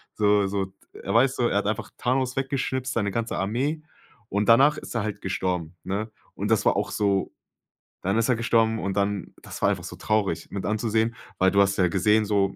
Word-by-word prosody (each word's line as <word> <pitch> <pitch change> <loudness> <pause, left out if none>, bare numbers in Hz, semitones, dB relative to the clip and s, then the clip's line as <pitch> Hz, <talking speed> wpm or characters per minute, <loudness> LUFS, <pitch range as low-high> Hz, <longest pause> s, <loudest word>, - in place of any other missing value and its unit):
So 105 -2 +3
so, 95 -1 -3 0.2
er - - -5
weiß 130 +3 +4
so, 120 - +2
er 100 - +1
hat 105 - -3
einfach 105 - -3
Thanos 130 +1 0
weggeschnippst, 130 -1 -1
seine 100 -4 0
ganze 115 +1 -2
Armee 135 +11 -1 0.5
und 100 +1 0
danach 140 +6 +6
ist - - -8
er 115 - 0
halt 105 -2 -4
gestorben, 90 -3 -2
ne? 100 +4 -3 0.3
Und - - -3
das - - +2
war - - +4
auch - - -1
so 100 -2 0 0.7
dann 95 +4 0
ist 115 - +1
er 125 - +4
gestorben 115 -1 +2
und 95 0 -2
dann 100 -2 -1
das - - -9
war - - +5
einfach - - -2
so - - -7
traurig 100 -6 0
mit 100 - -4
anzusehen, 110 +1 0 0.2
weil 95 0 +5
du 100 - +2
hast 100 0 +2
ja 90 -2 +4
gesehen, 105 +4 +3
so, 100 -2 +1
105 Hz, 210 wpm, -25 LUFS, 100-115 Hz, 0.7 s, danach